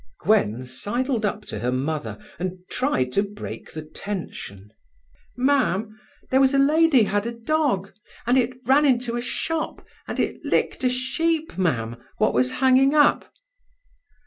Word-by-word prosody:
Gwen 125 - +2
sidled 225 - -2
up 210 +1 -4
to 105 - -6
her 120 +3 -1
mother, 130 -4 -2 0.2
and 185 +1 -3
tried 130 - 0
to 200 - +2
break 205 0 -7
the 155 - -6
tension. 155 - -7 0.7
"Mam, 235 -6 +1 0.4
there 265 +1 +5
was 270 +1 +4
a - - +4
lady 295 -2 +5
had 205 +1 0
a - - -2
dog, 235 -5 -1 0.3
and 245 +2 +3
it 255 0 +1
ran 285 +3 +5
into 245 -2 +1
a 240 - -1
shop, 315 +6 -3 0.2
and - - -4
it - - -2
licked - - 0
a 255 - +4
sheep, 315 +6 -1
Mam, 120 -11 -1 0.2
what - - +2
was 125 +1 +1
hanging 265 +2 +4
up." 295 -1 +3
230 Hz, 150 wpm, -24 LUFS, 160-265 Hz, 0.7 s, there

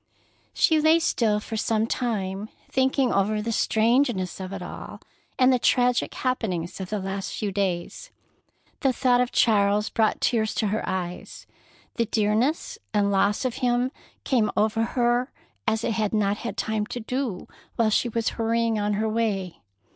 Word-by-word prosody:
She 315 -1 +4
lay 315 +2 +5
still 225 -10 +1
for 220 - -6
some 220 0 +1
time, 210 -4 -2 0.2
thinking 265 0 +2
over 205 +2 +1
the 225 +2 -2
strangeness 225 -4 +1
of 185 0 -6
it - - -5
all, - - -8 0.4
and 255 0 +5
the 250 - +2
tragic 245 +1 +2
happenings 195 -10 -2
of 185 - -6
the 210 - -1
last 195 0 -4
few 205 -2 -2
days. 190 - -2 0.7
The 270 -2 +2
thought 250 0 +3
of 250 - -1
Charles 210 -2 +3
brought 220 -2 +1
tears 220 -3 +1
to 215 - 0
her 215 +2 -1
eyes. 180 -1 -5 0.5
The 230 -2 +1
dearness 220 +9 0 0.2
and 200 -1 +2
loss 200 +4 +2
of 250 - -2
him 245 +1 +1 0.3
came 235 -5 +2
over 220 +1 +2
her 240 +2 +1 0.4
as 220 0 +1
it - - 0
had 215 -1 -1
not 205 -1 +1
had 235 - -5
time 220 -1 -1
to 245 - -5
do 240 -4 -3 0.3
while 225 -2 +2
she 240 - +2
was 230 0 0
hurrying 230 -1 0
on 205 0 0
her 215 +2 0
way. 210 -5 -2
220 Hz, 165 wpm, -25 LUFS, 205-245 Hz, 0.7 s, lay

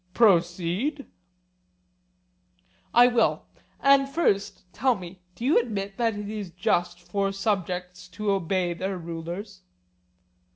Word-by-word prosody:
Proceed. 190 - +2 1.9
I 240 - +7
will; 245 -2 +2 0.3
and 275 0 +4
first 205 - 0
tell 260 -2 +2
me, 180 -1 -10
Do 235 - -5
you 280 - +5
admit 200 -4 -4
that 230 -3 +1
it 205 0 -5
is 210 -3 -5
just 175 0 0
for 195 +3 -1
subjects 180 -3 -2
to 205 +3 -2
obey 185 -1 0
their 190 +2 -3
rulers? 175 +4 -7
195 Hz, 115 wpm, -26 LUFS, 180-225 Hz, 1.9 s, I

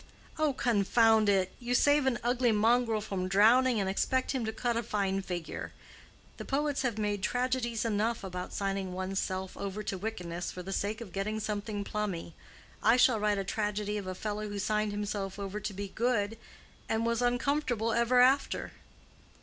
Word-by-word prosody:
"Oh, 305 -2 +2
confound 225 -2 +3
it! 190 -2 +2
You 245 0 -1
save 285 +1 +4
an 250 -3 +2
ugly 245 0 +2
mongrel 225 +1 +3
from 195 -3 -3
drowning, 225 +5 +5
and 195 - 0
expect 260 +7 0
him 260 -3 -1
to 220 - -1
cut 235 +1 -1
a 230 - +1
fine 200 -3 -1
figure. 175 -3 -5 0.6
The - - -6
poets 290 +1 0
have 245 -5 -1
made 205 -2 -1
tragedies 245 0 0
enough 225 +1 0
about 180 -1 -5
signing 195 -2 -2
one's 190 +1 -2
self 190 -1 -3
over 200 +1 -4
to 195 - -3
wickedness 180 -5 -4
for 180 - -7
the 195 +2 -5
sake 210 +4 -2
of 200 -6 -9
getting 215 +3 -2
something 210 -1 -3
plummy; 200 -6 -3 0.5
I 225 +3 +5
shall 250 -3 +5
write 210 -1 +1
a 195 - -1
tragedy 210 +1 -2
of 195 - -7
a 185 - -4
fellow 210 +1 -4
who 205 - -5
signed 210 +1 0
himself 205 -1 -3
over 200 +1 -4
to 210 - -4
be 200 0 -5
good, 225 -1 0 0.5
and 225 +1 +1
was 235 0 +1
uncomfortable 245 -2 +1
ever 235 +2 +4
after." 265 +3 +2
210 Hz, 180 wpm, -30 LUFS, 195-240 Hz, 0.6 s, drowning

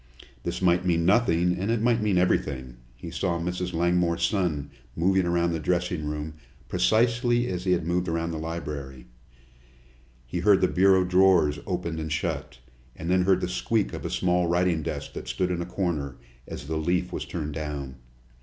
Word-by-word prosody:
This - - -4
might 90 0 +3
mean 85 -2 +1
nothing, 90 -4 +3
and 100 +4 -2
it 115 0 +2
might 115 0 +2
mean 105 -3 +1
everything. 65 -8 0 0.2
He 85 +7 -9
saw 85 +1 -1
Mrs. 90 +1 -3
Langmore's 85 0 +1
son 85 -6 0 0.2
moving 95 +2 +2
around 85 0 +1
the 80 - -2
dressing 90 0 -1
room 75 +1 -4 0.3
precisely 115 - +2
as 90 -2 -4
he 90 - +3
had 85 -2 0
moved 90 +1 0
around 85 0 -1
the 80 - -4
library. 75 -6 -6 1.2
He 85 +8 -4
heard 100 +1 +4
the 95 - +4
bureau 95 0 +4
drawers 90 -5 +4
opened 85 -3 -2
and 80 -1 -4
shut, 75 - -3 0.4
and 85 +2 -4
then 90 -1 +3
heard 95 -1 +3
the - - -1
squeak 105 +3 0
of - - -6
a - - -3
small 90 -1 +1
writing 85 -1 +2
desk - - -5
that - - -7
stood 90 -1 -1
in 85 -1 -1
a 85 - -4
corner, 85 -8 -2 0.3
as - - -7
the 80 +2 -2
leaf 85 +3 0
was - - -3
turned 75 -3 -4
down. 70 -4 -5
85 Hz, 180 wpm, -26 LUFS, 80-90 Hz, 1.2 s, heard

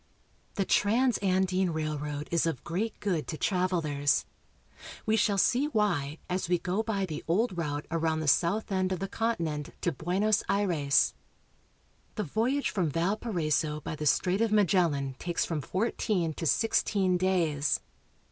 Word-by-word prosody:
The 195 - 0
Transandine 190 -6 +2
Railroad 150 -1 -3
is 170 -1 +2
of 160 -6 -3
great 200 +7 -3
good 180 -7 -1
to 155 - -4
trav 185 +1 +1
elers. 145 -5 +1 0.8
We 220 - +2
shall 210 -2 +2
see 255 +8 +3
why 175 - 0
as 180 -1 -2
we 180 - +3
go 180 +5 -1
by 210 -3 -1
the 155 -4 -6
old 195 +5 +1
route 150 -3 -3
around 160 -1 0
the 155 - -3
south 180 +9 +2
end 190 -1 0
of 185 - 0
the 195 - -3
continent 165 -11 -2
to 175 - +1
Buenos 190 +8 +1
Aires. 175 -9 +2 1.0
The 215 - -1
voyage 235 - 0
from 180 -6 0
Valparaiso 165 - -1
by 150 - -5
the 150 0 -2
Strait 180 +8 +2
of 230 -2 +2
Magellan 165 -10 +2
takes 175 -1 -1
from 160 -3 -2
fourteen 185 - -1
tb 165 - -3
sixteen 195 -2 +2
days. 170 -6 +1
180 Hz, 150 wpm, -29 LUFS, 155-205 Hz, 1.0 s, see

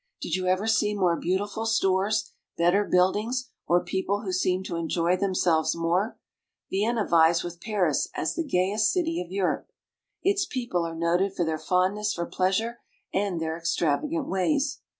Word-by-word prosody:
Did - - -5
you 185 -1 -2
ever 185 +3 +1
see 215 -2 +2
more 180 -4 +2
beautiful 205 +6 -2
stores, 200 0 +1 0.3
better 175 +4 +3
buildings, 215 +9 +1 0.2
or 175 +1 +3
people 190 +3 -1
who 190 -4 -4
seem 185 0 +1
to 180 - -5
enjoy 170 +1 +1
themselves 180 -5 +1
more? 175 +6 0 0.5
Vienna 215 +2 +1
vies 165 0 +4
with 175 0 -7
Paris 195 -8 +1
as - - -1
the 335 - -2
gayest 210 - +1
city 335 - 0
of 180 0 -8
Europe. 190 -1 -1 0.5
Its 390 -2 +2
people 235 -10 -2
are 165 - -6
noted 175 +4 +1
for 175 - 0
their 160 -1 -2
fondness 190 +6 +1
for 170 - -2
pleasure 195 +7 -1 0.3
and 195 -3 0
their 160 0 -2
extravagant 170 - -1
ways. 275 +9 0
190 Hz, 160 wpm, -26 LUFS, 175-215 Hz, 0.5 s, vies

